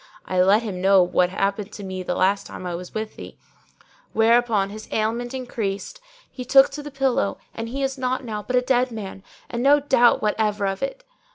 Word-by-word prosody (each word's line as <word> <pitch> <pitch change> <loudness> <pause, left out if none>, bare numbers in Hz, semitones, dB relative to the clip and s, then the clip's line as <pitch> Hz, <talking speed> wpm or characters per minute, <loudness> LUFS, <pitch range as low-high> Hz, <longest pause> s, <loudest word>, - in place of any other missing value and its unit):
I 185 -1 +1
let 200 +5 +4
him 190 -5 -5
know 195 -1 +5
what 180 0 +2
happened 200 +2 -2
to 205 - -8
me 185 -1 -5
the 180 - -3
last 195 +2 +1
time - - -9
I 175 - -3
was 180 +1 -7
with 215 0 -4
thee, - - -10 0.8
whereupon 225 -3 +3
his 215 +1 -9
ailment 230 +3 -1
increased, 225 - -4 0.3
he 255 - -7
took 270 +2 +6
to 295 +1 -6
the 295 - -8
pillow 270 -7 0 0.2
and 225 0 -5
he 275 +3 -3
is 270 0 -2
naught 255 +1 -1
now 215 -3 -4
but 250 +4 -3
a 250 - +4
dead 250 0 +2
man, 200 -4 -7 0.3
and 235 - -4
no 285 +3 +5
doubt 265 -4 +4
what 210 -1 +1
ever 210 -2 0
of 195 0 -2
it.' - - -4
220 Hz, 210 wpm, -23 LUFS, 195-250 Hz, 0.8 s, took